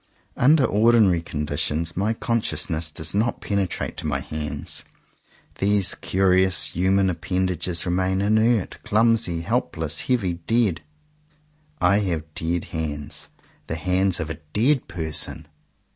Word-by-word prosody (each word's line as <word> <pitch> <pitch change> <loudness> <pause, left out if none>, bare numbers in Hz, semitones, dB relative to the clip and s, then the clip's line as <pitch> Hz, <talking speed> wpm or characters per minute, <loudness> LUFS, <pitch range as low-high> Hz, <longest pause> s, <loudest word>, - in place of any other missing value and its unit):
Under 140 +2 +4
ordinary 110 -5 +4
conditions 75 +1 -2
my 100 +4 0
conscious 115 -11 -1
ness 80 0 -1
does 80 +1 -2
not 110 +4 0
penetrate 100 -4 -2
to - - -4
my - - -1
hands. 75 -1 -4 0.8
These 100 -1 +5
curious 95 0 +2
human 95 +2 +2
appendages 90 -1 -1
remain 95 +1 0
inert, 110 +1 +1
clumsy, 110 -6 +2
helpless, 85 - -1
heavy, 95 -10 -1
dead. 115 -8 +1 1.0
I 90 +3 +3
have 80 -6 -3
dead 85 +2 -2
hands 75 -3 -4 0.2
— - - -34
the 80 - -3
hands 90 +2 +1
of 80 -1 -3
a 80 - -7 0.2
dead 130 +5 +2
person! 80 -3 -1
95 Hz, 125 wpm, -23 LUFS, 80-105 Hz, 1.0 s, These